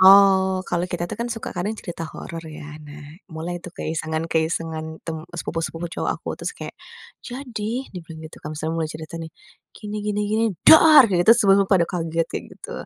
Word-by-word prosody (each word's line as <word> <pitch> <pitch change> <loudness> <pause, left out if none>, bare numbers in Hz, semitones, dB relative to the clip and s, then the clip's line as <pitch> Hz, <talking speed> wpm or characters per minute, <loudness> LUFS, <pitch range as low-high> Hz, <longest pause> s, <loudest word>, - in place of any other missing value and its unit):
oh 190 -1 +7
kalau 175 0 0
kita 175 -1 -2
tuh - - -5
kan 235 - -1
suka 225 -1 -5
karena 180 +4 -1
cerita 170 -2 -6
horor 165 -1 -7
ya. 150 -1 -9
Nah, 150 0 -11 0.3
mulai 165 +2 -4
itu 180 - -8
keisengan-keisengan 160 0 -2
tem 165 -1 -3
sepupu-sepupu 165 0 -4
cowok - - -1
aku - - -8
terus - - -4
kayak - - -7 0.5
jadi 245 -1 -4
dibilang 165 -3 -8
gitu - - -14
kan 150 - -4
misalnya 155 +1 -3
mulai 160 -2 -1
cerita 155 +1 -8
nih, 165 -1 -6 0.4
gini 210 0 -7
gini 210 0 -1
gini 220 +2 +2 0.2
dar 310 -4 +9
gitu 180 +3 +6
semua 200 -4 +5
pada 180 -4 +4
kaget 165 -1 -1
kayak - - -4
gitu, - - -8
175 Hz, 175 wpm, -23 LUFS, 160-205 Hz, 0.5 s, dar